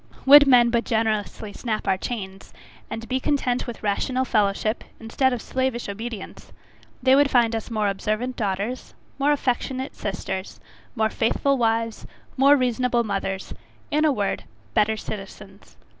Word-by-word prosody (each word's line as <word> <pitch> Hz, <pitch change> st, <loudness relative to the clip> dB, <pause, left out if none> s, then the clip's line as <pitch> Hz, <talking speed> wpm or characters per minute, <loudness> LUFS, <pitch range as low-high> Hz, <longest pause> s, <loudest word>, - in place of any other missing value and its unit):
Would 285 Hz, +1 st, +9 dB
men 240 Hz, -3 st, +6 dB
but 235 Hz, 0 st, +1 dB
generously 220 Hz, -2 st, -1 dB
snap 220 Hz, -3 st, -3 dB
our 190 Hz, -, +3 dB
chains, 195 Hz, -2 st, -6 dB, 0.4 s
and 230 Hz, +1 st, -6 dB
be 260 Hz, 0 st, 0 dB
content 260 Hz, -3 st, 0 dB
with 235 Hz, -2 st, -7 dB
rational 255 Hz, +5 st, 0 dB
fellowship, 215 Hz, 0 st, 0 dB, 0.2 s
instead 250 Hz, +4 st, +1 dB
of 245 Hz, -3 st, -3 dB
slavish 260 Hz, -2 st, -2 dB
obedience, 220 Hz, +1 st, -7 dB, 0.5 s
they 260 Hz, 0 st, +5 dB
would 280 Hz, +1 st, +5 dB
find 235 Hz, -3 st, +3 dB
us 225 Hz, -, -4 dB
more 215 Hz, -3 st, 0 dB
observant 215 Hz, +5 st, -2 dB
daughters, 205 Hz, +4 st, -3 dB, 0.2 s
more 285 Hz, +2 st, +3 dB
affectionate 260 Hz, -1 st, -1 dB
sisters, 190 Hz, -1 st, -5 dB, 0.4 s
more 220 Hz, -1 st, +1 dB
faithful 275 Hz, +5 st, +1 dB
wives, 230 Hz, -2 st, -1 dB, 0.3 s
more 280 Hz, +2 st, +6 dB
reasonable 250 Hz, -1 st, +1 dB
mothers 195 Hz, -2 st, -3 dB, 0.4 s
in 300 Hz, +1 st, +2 dB
a 310 Hz, -, +4 dB
word, 205 Hz, -7 st, -2 dB, 0.3 s
better 220 Hz, +1 st, +2 dB
citizens. 200 Hz, -1 st, -9 dB
230 Hz, 145 wpm, -24 LUFS, 210-255 Hz, 0.5 s, Would